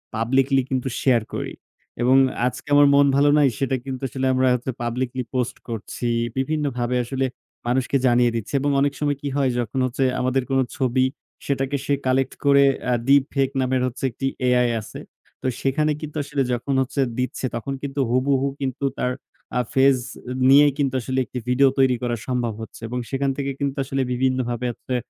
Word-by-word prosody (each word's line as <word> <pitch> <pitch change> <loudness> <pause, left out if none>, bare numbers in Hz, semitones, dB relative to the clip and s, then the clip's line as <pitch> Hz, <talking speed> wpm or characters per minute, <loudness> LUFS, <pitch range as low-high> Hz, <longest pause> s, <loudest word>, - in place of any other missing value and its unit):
Publicly 135 +4 +2
কিন্তু 130 0 -1
share 120 -5 +3
করি। - - -4 0.5
এবং 125 +2 +4 0.3
আজকে 125 - -6
আমার 145 0 +7
মন 140 0 +6
ভালো 145 +1 +4
নাই 145 - +5
সেটা 135 -1 0
কিন্তু 130 -1 -5
আসলে 130 +2 -1
আমরা 130 0 +2
হচ্ছে 125 +2 -3
পাবলিকলি 125 +2 -2
পোস্ট 125 -1 -1
করছি। 115 +2 -4 0.3
বিভিন্নভাবে 135 -4 -1
আসলে 135 +2 -1 0.4
মানুষকে 130 +2 +1
জানিয়ে 120 0 +4
দিচ্ছি। 115 +4 -4
এবং 145 +1 +1
অনেক 140 0 +2
সময় 145 -2 0
কি 145 - -4
হয়? 135 -2 +2
যখন 120 +3 -2
হচ্ছে 130 +2 -1 0.2
আমাদের 130 +1 +1
কোনো 135 0 +3
ছবি 130 -1 +2 0.4
সেটাকে 135 0 -1
সে 145 - +1
কালেক্ট 130 +1 +1
করে 140 0 +6 0.3
আ - - +3
ডিপ 140 0 +6
ফেক 135 -1 +2
নামের 130 0 +1
হচ্ছে 125 - -7
একটি 135 - -5 0.2
AI 125 -1 +3
আছে। 105 - -9 0.4
তো - - 0
সেখানে 150 +3 +1
কিন্তু 155 0 -6
আসলে 140 -1 -1
যখন 135 +3 -1 0.4
দিচ্ছে 130 +1 -2
তখন 120 +4 -4
কিন্তু 140 0 -4
হুবুহু 135 +2 +2
কিন্তু 135 +1 -2
তার 125 - 0 0.5
আ - - +4
ফেস 135 0 +5 0.5
নিয়েই 145 +2 +7
কিন্তু 135 -2 0
আসলে 130 +2 -2
একটি 125 - -6
ভিডিও 135 +2 +5
তৈরি 130 -1 +4
করা 120 -1 0
সম্ভব 125 -3 -1
হচ্ছে। 110 - -10
এবং 125 +2 -3
সেখান 135 0 0
থেকে 140 -1 -2
কিন্তু 140 -1 -1
আসলে 135 0 -1
বিভিন্নভাবে 125 -1 0
হচ্ছে 125 - -5
130 Hz, 175 wpm, -23 LUFS, 125-140 Hz, 0.5 s, আমার